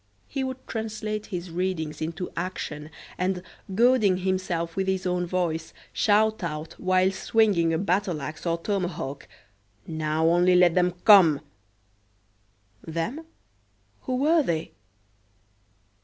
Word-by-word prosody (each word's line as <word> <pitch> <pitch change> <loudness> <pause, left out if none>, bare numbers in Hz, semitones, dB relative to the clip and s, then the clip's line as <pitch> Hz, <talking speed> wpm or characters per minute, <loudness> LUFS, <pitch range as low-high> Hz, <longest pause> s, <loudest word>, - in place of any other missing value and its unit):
He 270 -1 -3
would 260 0 -5
translate 215 -1 -4
his 180 -3 -5
readings 170 -3 -2
into 165 +3 -4
action, 160 -4 -4 0.3
and, 180 0 -1 0.3
goading 230 -4 +4
himself 180 -3 -2
with 190 0 -1
his 190 -1 -1
own 180 -1 0
voice, 170 -3 -2 0.2
shout 215 0 +2
out 155 -1 -4
whilst 185 +1 +1
swinging 200 -7 +3
a 160 - +1
battle 185 -2 0
axe 155 +4 -6
or 165 0 +1
tomahawk: 175 -7 -3 0.6
"Now, 155 0 -1
only 175 +2 +4
let 180 -2 +5
'em 180 -1 +3
come!" 175 -9 +7 1.5
"Them"? 220 - -4 0.7
who 255 - -2
were 310 +5 +3
they? 165 - -2
180 Hz, 120 wpm, -26 LUFS, 165-205 Hz, 1.5 s, come